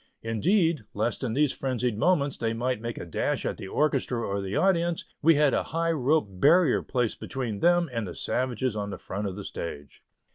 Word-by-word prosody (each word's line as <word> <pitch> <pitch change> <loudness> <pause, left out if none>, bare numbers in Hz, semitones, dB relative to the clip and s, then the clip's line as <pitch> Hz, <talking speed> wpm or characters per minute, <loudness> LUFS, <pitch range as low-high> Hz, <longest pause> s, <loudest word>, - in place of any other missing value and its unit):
Indeed, 160 - +2
lest 110 +5 -1
in 120 -4 -1
these 145 +1 +3
frenzied 125 -3 -1
moments 145 - +2
they 115 -1 -1
might 125 0 -1
make 115 0 -4
a - - -6
dash - - -1
at - - -2
the - - -7
orchestra 135 -1 0
or 100 -3 -2
the 95 +1 -4
audience, 175 -3 +1 0.2
we 165 +1 +6
had 145 -1 +3
a - - +2
high 165 +1 -1
rope 150 -1 +2
barrier 130 - +4
placed 125 -4 -1
between 120 -6 -4
them 175 +3 +4
and 115 -4 -2
the 85 - -7
savages 130 -2 -1
on 100 -1 -3
the 95 - -5
front 100 +3 -4
of 95 - -5
the 100 - -6
stage. 75 -6 -7
125 Hz, 205 wpm, -27 LUFS, 105-155 Hz, 0.2 s, we